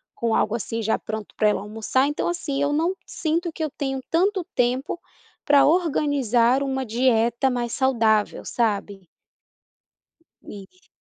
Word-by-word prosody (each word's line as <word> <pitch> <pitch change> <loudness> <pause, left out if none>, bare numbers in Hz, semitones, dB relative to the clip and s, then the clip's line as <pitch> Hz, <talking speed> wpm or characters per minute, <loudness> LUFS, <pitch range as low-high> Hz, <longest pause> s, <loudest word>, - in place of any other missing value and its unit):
com 230 -1 0
algo 215 - +1
assim 230 0 -3
já 220 +1 0
pronto 215 -1 -6
pra 215 - +3
ela 200 - 0
almoçar, 225 +6 0
então, 295 - -2
assim, 285 -5 -3
eu 285 +1 +1
não 330 +5 +1
sinto 335 +1 -2
que 320 - -4
eu 310 - -1
tenho 270 -2 -3
tanto 370 +2 +1
tempo 255 +7 0 0.5
pra 285 -1 +5
organizar 275 - +2
uma 265 -1 -2
dieta 235 +1 +2
mais 240 -2 -2
saudável, 225 -5 +1
sabe? 200 -5 -2 1.4
Isso. 205 - -13
260 Hz, 140 wpm, -23 LUFS, 225-295 Hz, 1.4 s, pra